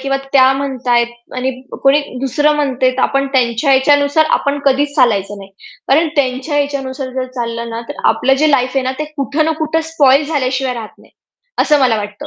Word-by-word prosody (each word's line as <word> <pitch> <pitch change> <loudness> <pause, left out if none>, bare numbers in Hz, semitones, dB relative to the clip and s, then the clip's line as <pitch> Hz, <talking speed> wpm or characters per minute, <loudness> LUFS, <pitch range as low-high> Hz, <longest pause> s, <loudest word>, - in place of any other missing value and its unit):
किंवा 275 0 -1 0.2
त्या 265 -1 +5
म्हणतायेत 255 -3 0 0.3
आणि 255 +1 -1 0.2
अ, - - -6
कोणी 275 +2 +4 0.2
दुसरं 290 +3 +1
म्हणतंय, 260 -3 +1
तर 255 0 -3
आपण 275 0 +1
त्यांच्या 250 +1 +1
याच्यानुसार 285 +3 +3
आपण 285 0 -2
कधीच 285 +1 +1
चालायचं 205 -6 +1
नाही. 195 0 -12 0.4
कारण 315 +4 +3
त्यांच्या 275 +2 0
याच्यानुसार 275 -2 -3
जर 260 -1 -2
चाललं 235 -1 -4
ना, 230 - -5
तर - - -7
आपलं 270 +1 +1
जे 310 - +4
लाईफ 255 -2 +2
आहे 270 - +1
ना, 260 - -1
ते 305 - -2
कुठे 285 +2 -1
ना 320 - +1
कुठे 320 +1 -1
स्पॉइल 280 -1 +4
झाल्याशिवाय 265 -3 -1
राहत 225 -3 -9
नाही. - - -21 0.5
असं 300 -2 +3
मला 250 -4 +3
वाटतं. 205 -1 -6
270 Hz, 190 wpm, -15 LUFS, 250-285 Hz, 0.5 s, त्या